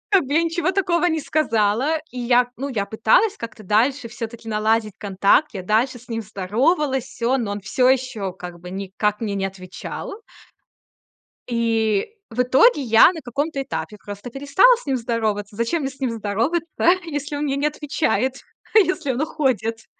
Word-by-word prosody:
Как 385 -8 +4
бы 285 - -2
я 330 - +4
ничего 335 +2 0
такого 360 -2 +1
не 320 -2 +1
сказала, 255 -1 +1 0.2
и 250 - -5
я 245 0 +3
ну, 275 +2 -4
я 205 -6 -2
пыталась 225 - +3
как-то 230 -1 -8
дальше 235 +6 +2
всё-таки 230 0 -7
наладить 215 0 +1
контакт. 200 +8 +2
Я 190 - -4
дальше 235 +6 +1
с 245 - -19
ним 225 -1 -3
здоровалась, 255 - 0
всё, 245 +1 -1
но 230 -5 -2
он 205 - -4
всё 200 +7 +2
ещё 250 -7 0
как 175 -2 -9
бы 180 0 -9
никак 200 +2 -2
мне 210 -3 -2
не 195 -1 -1
отвечал. 190 - -8 1.3
И 225 -3 +1 0.2
в 240 +2 0
итоге 275 - +4
я 225 +6 +6
на 325 - -7
каком-то 280 +4 -2
этапе 225 -5 -5
просто 205 +4 -8
перестала 285 - +4
с 485 - -14
ним 270 -2 0
здороваться. 215 -3 -2
Зачем 235 +9 -1
мне 270 - -2
с 275 - -19
ним 255 -3 -1
здороваться, 230 +10 -1 0.4
если 290 -2 -4
он 290 - -2
мне 275 -2 0
не 290 +2 +1
отвечает, 280 -4 -1 0.4
если 360 -9 +3
он 255 +4 -2
уходит? 230 -7 -1
240 Hz, 175 wpm, -22 LUFS, 215-285 Hz, 1.3 s, я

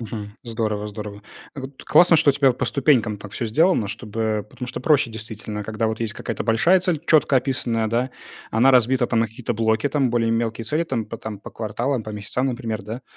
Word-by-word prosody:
Мгм. 105 -2 -7
Здорово, 110 -3 -2
здорово. 105 0 -8 0.3
Вот, 135 -1 -9
классно, 175 -1 +6
что 155 -2 +5
у - - 0
тебя 135 -2 +4
по 125 - -3
ступенькам 125 -7 +2
так 100 0 -10
всё 115 - -3
сделано, 155 - +3
чтобы 110 -1 -3
потому 125 - -7
что 125 - -6
проще 150 -5 +3
действительно, 110 -1 -6
когда 110 +2 -2
вот 110 +1 -3
есть 115 -2 -1
какая-то - - -4
большая 165 +12 +4
цель, 175 -5 0
чётко 150 -3 +4
описанная, 120 -4 0
да, 120 +4 0 0.4
она 125 +5 +4
разбита 125 0 +4
там 115 -2 +1
на 115 - +2
какие-то 115 +1 -4
блоки, 110 +4 +1
там 135 -3 +1
более 115 -1 +1
мелкие 115 0 -1
цели, 150 +9 0
там 125 -9 -2
по 115 - -6
там 110 -2 -7
по - - -10
кварталам, 120 +4 -2
по 110 - -7
месяцам, 105 +5 -2
например, 115 -5 -3
да. 110 +5 -7
115 Hz, 210 wpm, -22 LUFS, 110-130 Hz, 0.4 s, классно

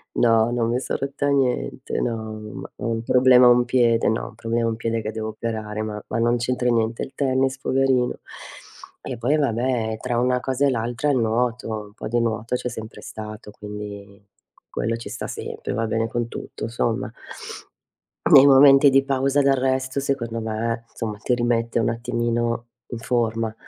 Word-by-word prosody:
No, 115 0 +3
non 115 -1 0
mi 125 +2 +1
son - - -3
rotta 140 +1 -2
niente, 130 -1 0
no, 110 -2 -3 0.2
ma - - -8
ho - - -5
un 115 -1 -1
problema 125 0 +6
a - - +8
un 120 0 +5
piede, 120 -2 +3
no, 110 - -1
un 110 - -13
problema 115 0 -1
a - - +1
un 115 - -2
piede 115 0 -2
che 110 - -4
devo 110 0 -4
operare, 110 -1 -4
ma 105 -1 -4
ma 115 - -1
non 120 +1 +2
c'entra 125 +1 0
niente 115 -1 0
il 135 - -8
tennis 130 -1 +1
poverino. 130 -2 +1 0.8
E 125 - -6
poi 125 +6 +1
vabbè 120 -4 0
tra 120 -2 -1
una 125 0 +2
cosa 130 +2 0
e - - +3
l'altra 120 +4 -1
il 140 - +3
nuoto, 115 +1 0
un 105 -2 -5
po' 110 - -7
di 120 +2 +1
nuoto 115 0 -2
c'è 125 0 -3
sempre 110 -1 -8
stato, 105 -1 -8
quindi 100 -1 -9 0.5
quello 115 +1 -2
ci 115 - -8
sta - - -5
sempre, - - -5
va 115 0 -1
bene 115 0 0
con 120 +1 -2
tutto 115 - -6
somma. 115 -1 -1 1.2
Nei 135 - +10
momenti 135 +1 +8
di 135 0 +4
pausa 135 +1 +1
d'arresto 130 -1 +1
secondo 120 -5 -2
me, 115 +1 -3
insomma, 110 -3 -5
ti 125 +4 0
rimette 120 -1 0
un 115 - +1
attimino 120 0 -1 0.2
in 120 - -4
forma. 115 -2 -1
120 Hz, 180 wpm, -23 LUFS, 115-130 Hz, 1.2 s, Nei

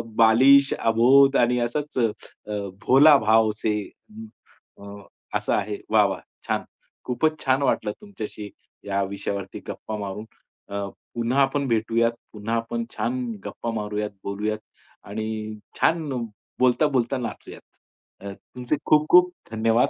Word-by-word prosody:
बालिश, 135 +5 +6
अबोध 130 +5 +5
आणि 120 0 +3
असच 145 +5 -3
अ, 120 -3 +4 0.4
अ, 100 -1 -3 0.2
भोला 145 +3 +8
भाव 110 -1 +3
से 105 -1 0 1.0
अ, - - -13
अ, 100 0 -10 0.4
असं - - -2
आहे. 105 0 -1
वाह! 110 -1 +5
वाह! 95 -2 -4 0.3
छान. - - 0 0.4
खूपच 155 +5 0
छान 130 +1 +2
वाटलं 105 - +1
तुमच्याशी 110 - -7 0.4
या 100 0 0
विषयावरती 100 0 -5
गप्पा 110 - -6
मारून. 100 +1 -5 0.4
अ, 100 0 -3 0.3
पुन्हा 120 +4 +1
आपण 140 0 +1
भेटूयात. 115 0 +1 0.2
पुन्हा 110 +2 -3
आपण 115 - -2
छान 255 +1 -1 0.2
गप्पा 115 - -4
मारूयात, 105 -1 -3
बोलूयात 105 +2 -2 0.5
आणि 110 0 -4 0.2
छान 160 -2 +2 0.5
बोलता-बोलता 130 0 +2
नाचूयात. 120 -2 -7 0.6
अ, 100 - -5
तुमचे 125 +7 -4
खूप-खूप 175 +4 +5 0.2
धन्यवाद. 115 +2 +2
115 Hz, 125 wpm, -24 LUFS, 105-135 Hz, 1.0 s, भोला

